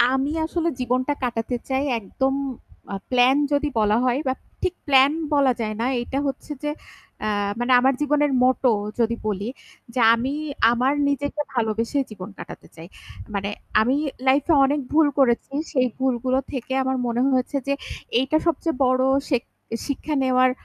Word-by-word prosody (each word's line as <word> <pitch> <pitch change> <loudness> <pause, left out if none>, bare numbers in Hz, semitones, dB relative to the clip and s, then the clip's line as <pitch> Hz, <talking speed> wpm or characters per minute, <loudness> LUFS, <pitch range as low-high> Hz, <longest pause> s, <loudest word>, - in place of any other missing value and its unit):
আমি 265 +3 +2
আসলে 335 +1 -1
জীবনটা 255 +3 0
কাটাতে 240 0 -2
চাই 265 0 0 0.2
একদম 265 +6 -1 0.6
আ - - -2 0.2
প্লান 255 +1 +5 0.2
যদি 290 +1 +2
বলা 210 0 +3
হয় 250 +1 +2
বা 260 - +2 0.3
ঠিক 370 -1 0
প্লান 270 -1 +6 0.2
বলা 275 -3 +4
যায় 215 -1 -2
না। - - 0 0.2
এটা 265 +3 -3
হচ্ছে 275 +2 -5
যে 295 - -1 0.5
এ্যা 215 - -1 0.3
মানে 250 +1 +1
আমার 265 +1 +3
জীবনের 295 -1 +2
মোটো 255 0 +3 0.3
যদি 235 0 +2
বলি। 205 -1 -2 0.5
যে 255 - 0
আমি 250 +4 -2 0.4
আমার 255 +3 +2 0.2
নিজেকে 285 +1 -2
ভালোবেসে 230 +3 0
জীবন 195 -1 -8
কাটাতে - - -10
চাই। 165 - -10 0.5
মানে 200 0 -2 0.3
আমি 250 +5 +2 0.3
লাইফ 270 +2 +4
এ - - +6
অনেক 285 +2 +1
ভুল 315 0 +5
করেছি। 250 -1 +2 0.2
সেই 255 -3 +3
ভুলগুলো 260 0 +1
থেকে 260 -1 -4
আমার 260 0 0
মনে 235 +1 -1
হয়েছে 260 +2 0
যে 280 - +1 0.5
এইটা 270 +4 +1
সবচেয়ে 330 -3 0
বড় 255 0 +3 0.3
শেখ 250 -4 +2 0.5
শিক্ষা 300 +2 -2
নেওয়ার 255 0 +4
260 Hz, 160 wpm, -23 LUFS, 240-280 Hz, 0.6 s, প্লান